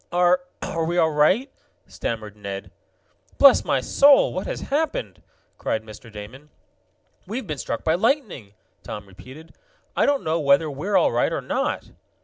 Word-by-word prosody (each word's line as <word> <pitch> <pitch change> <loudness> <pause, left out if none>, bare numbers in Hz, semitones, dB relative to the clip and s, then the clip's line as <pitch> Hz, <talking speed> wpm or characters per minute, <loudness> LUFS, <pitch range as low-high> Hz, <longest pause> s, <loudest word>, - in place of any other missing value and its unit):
"Are 180 +1 +3 0.2
are 165 - -2
we 170 +2 -1
all 160 -2 +3
right?" 170 - +2 0.3
stammered 110 -3 -5
Ned. 100 -1 -7 0.7
"Bless 275 -2 +7
my - - 0
soul! 280 0 +5
What - - -4
has - - -4
happened?" 320 - -2 0.4
cried 110 - -2
Mr. 110 +1 -13
Damon. 110 +8 -11 0.8
"We've 225 +5 -4
been 150 -6 -5
struck 115 - -4
by 160 - +2
lightning!" 190 - -1 0.3
Tom 105 -1 -7
repeated. 130 - -14 0.4
"I - - +2
don't 285 -1 +1
know 160 +1 0
whether 145 +1 +3
we're 160 +9 0
all - - +3
right - - +1
or - - -2
not." - - -2
160 Hz, 155 wpm, -23 LUFS, -, 0.8 s, Bless